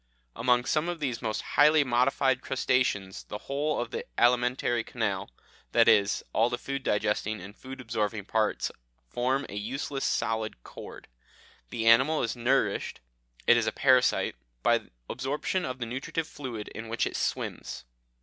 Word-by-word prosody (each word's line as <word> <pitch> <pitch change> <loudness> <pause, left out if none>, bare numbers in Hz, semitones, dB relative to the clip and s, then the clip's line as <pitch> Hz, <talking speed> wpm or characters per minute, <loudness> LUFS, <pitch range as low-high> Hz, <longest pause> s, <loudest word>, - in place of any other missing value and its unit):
Among 125 +1 +2
some 155 +3 +1
of 175 -1 -4
these 130 -6 -2
most 110 -3 -2
highly 150 +1 +5
modified 130 +1 +2
crustaceans 125 -8 0
the 105 - -6
whole 145 +6 -2
of 120 -1 -3
the - - -3
alimentary 120 0 +2
canal 100 -6 -2 0.4
that - - +5
is, 100 -1 +4
all 115 +2 +3
the 120 - -2
food 140 +2 -4
digesting 105 -1 0
and 95 +3 -10
food 130 0 -10
absorbing 110 -4 -2
parts 110 0 0 0.4
form 130 - 0
a - - -10
useless 135 +6 -3
solid 110 - -1
cord: - - -10 0.6
the 115 - -3
animal 130 +7 +5
is 115 - -1
nourished 120 -3 0 0.5
it 120 - +6
is 115 - +1
a - - +2
parasite 130 -2 +3 0.3
by - - +4 0.3
absorption 140 +8 -2
of 130 - -4
the 125 - -3
nutritive 135 +7 -3
fluid 125 -9 -6
in 110 0 -8
which 115 - 0
it - - -4
swims. - - -3
120 Hz, 155 wpm, -28 LUFS, 110-135 Hz, 0.6 s, it